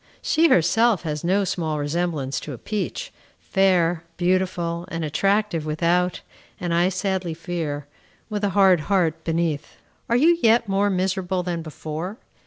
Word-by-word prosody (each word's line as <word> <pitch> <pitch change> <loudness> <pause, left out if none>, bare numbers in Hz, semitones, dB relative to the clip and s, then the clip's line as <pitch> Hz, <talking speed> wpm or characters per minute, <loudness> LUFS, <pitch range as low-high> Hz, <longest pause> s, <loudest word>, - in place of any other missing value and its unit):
she 330 +1 +4
herself 215 +4 +3
has 150 -2 -3
no 190 +4 +2
small 165 -5 -2
resemblance 145 -2 -1
to 150 - -7
a - - -7
peach, 215 - -4 0.3
fair, 175 -4 +2
beautiful, 175 -2 0
and 165 -1 -3
attractive 195 +2 +1
without, 170 +4 0 0.4
and, 175 -1 -2
I 175 +2 +3
sadly 190 -3 -2
fear, 160 -4 -4 0.4
with 210 -1 -4
a 205 - +2
hard 190 -3 +6
heart 165 -5 +1
beneath. 165 -3 -2 0.3
Are 235 - +3
you 335 +5 +4
yet 230 0 +4
more 200 +1 +2
miserable 185 -1 -1
than 175 -2 -3
before? 160 +5 -6
175 Hz, 145 wpm, -23 LUFS, 165-195 Hz, 0.4 s, hard